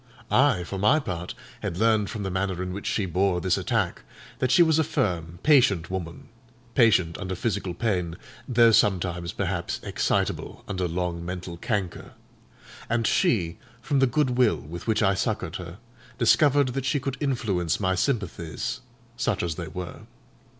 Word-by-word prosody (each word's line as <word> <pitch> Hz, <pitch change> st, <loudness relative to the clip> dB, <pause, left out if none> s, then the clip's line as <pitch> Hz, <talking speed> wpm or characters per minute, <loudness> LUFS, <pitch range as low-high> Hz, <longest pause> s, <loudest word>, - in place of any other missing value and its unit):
I, 130 Hz, -10 st, +4 dB
for 95 Hz, +2 st, -5 dB
my 120 Hz, +10 st, +4 dB
part, 90 Hz, -, -5 dB, 0.3 s
had 95 Hz, -5 st, -3 dB
learned 110 Hz, -1 st, +2 dB
from 105 Hz, -, -5 dB
the 95 Hz, -, -3 dB
manner 95 Hz, -1 st, -1 dB
in 90 Hz, 0 st, -4 dB
which 100 Hz, -, -5 dB
she 105 Hz, -, 0 dB
bore 95 Hz, +1 st, +1 dB
this 90 Hz, 0 st, +1 dB
attack, -, -, -1 dB, 0.4 s
that 130 Hz, -, +1 dB
she 135 Hz, +8 st, +6 dB
was 160 Hz, -1 st, +3 dB
a -, -, +4 dB
firm, 85 Hz, -, -2 dB
patient 105 Hz, -, +4 dB
woman 85 Hz, -3 st, -6 dB, 0.4 s
(patient 100 Hz, -9 st, +3 dB
under 95 Hz, -1 st, -3 dB
physical 100 Hz, -3 st, -2 dB
pain, 90 Hz, -6 st, -1 dB, 0.3 s
though 120 Hz, -2 st, +5 dB
sometimes 90 Hz, -4 st, +2 dB
perhaps 95 Hz, -5 st, -2 dB
excitable -, -, -1 dB
under 95 Hz, -3 st, -1 dB
long 85 Hz, 0 st, -3 dB
mental 90 Hz, 0 st, -5 dB
canker); 95 Hz, -1 st, -3 dB, 0.8 s
and 115 Hz, 0 st, +1 dB
she, 105 Hz, -, +1 dB, 0.2 s
from 140 Hz, -, 0 dB
the 135 Hz, -, +5 dB
good 130 Hz, +1 st, +1 dB
will 125 Hz, -3 st, +4 dB
with 85 Hz, +7 st, -9 dB
which 110 Hz, 0 st, +2 dB
I 100 Hz, -1 st, +4 dB
succoured 95 Hz, -4 st, -2 dB
her, 90 Hz, 0 st, -8 dB, 0.4 s
discovered 140 Hz, +3 st, +4 dB
that 135 Hz, +1 st, -3 dB
she 145 Hz, +1 st, +1 dB
could 135 Hz, -1 st, -3 dB
influence 110 Hz, -, 0 dB
my 95 Hz, -2 st, +1 dB
sympathies 95 Hz, -, -2 dB, 0.4 s
(such -, -, 0 dB
as 85 Hz, -2 st, -1 dB
they 85 Hz, 0 st, -6 dB
were). 85 Hz, +3 st, -7 dB
95 Hz, 165 wpm, -26 LUFS, 90-120 Hz, 0.8 s, she